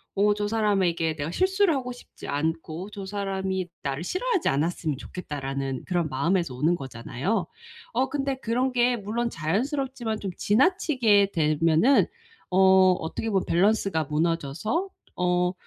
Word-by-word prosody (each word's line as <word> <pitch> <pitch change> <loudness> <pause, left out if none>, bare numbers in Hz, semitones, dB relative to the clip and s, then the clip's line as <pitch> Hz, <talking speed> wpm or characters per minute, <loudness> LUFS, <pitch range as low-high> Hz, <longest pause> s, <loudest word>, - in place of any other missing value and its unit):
어 205 +1 +4
사람에게 190 -7 +1
내가 150 0 -3
실수를 375 - +2
하고 250 -2 -3
싶지 245 - -11
않고 160 +4 -3
저 200 -2 -7
사람이 190 -2 -2 0.2
나를 140 +3 -2
싫어하지 400 - 0
않았으면 155 0 -1
좋겠다.'라는 135 -5 -5
그런 175 -4 0
마음에서 160 +1 0
오는 155 +7 +2
거잖아요. 135 - -3 0.5
어 260 +3 +1
근데 275 -1 -1
그런 250 +2 0
게 245 0 +3
물론 230 +3 -2
자연스럽지만 235 - -2
좀 195 -3 -4
지나치게 230 - +3
되면은 160 - +3 0.4
어 190 0 +6
어떻게 180 +7 -4
보면 195 -3 +1
밸런스가 195 -2 +2
무너져서 165 - -1 0.3
어 180 0 +1
190 Hz, 320 characters per minute, -26 LUFS, 160-235 Hz, 0.5 s, 어